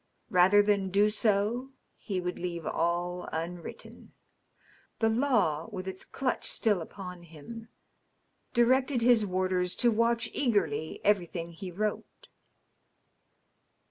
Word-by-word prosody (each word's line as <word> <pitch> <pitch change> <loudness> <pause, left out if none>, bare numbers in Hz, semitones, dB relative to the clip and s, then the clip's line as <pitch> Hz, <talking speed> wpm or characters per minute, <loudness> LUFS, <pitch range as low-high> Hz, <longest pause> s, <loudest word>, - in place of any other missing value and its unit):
Rather 190 +3 +6
than 200 -2 +1
do 200 +3 +4
so 215 +4 +1 0.3
he 195 -4 -4
would 180 0 -4
leave 170 -2 -4
all 175 +1 -1
unwritten. 170 +2 -7 0.8
The 225 - +2
law, 220 - +1
with 185 0 -6
its 190 0 -6
clutch 265 -2 -2
still 205 -6 +1
upon 180 +1 -8
him, 170 +8 -11 0.8
directed 255 +1 +3
his 230 -3 +4
warders 185 -1 0
to 240 - +3
watch 230 +1 +1
eagerly 170 - 0
everything 175 -4 0
he 185 +3 -8
wrote. 210 +4 -4
195 Hz, 110 wpm, -29 LUFS, 175-225 Hz, 0.8 s, Rather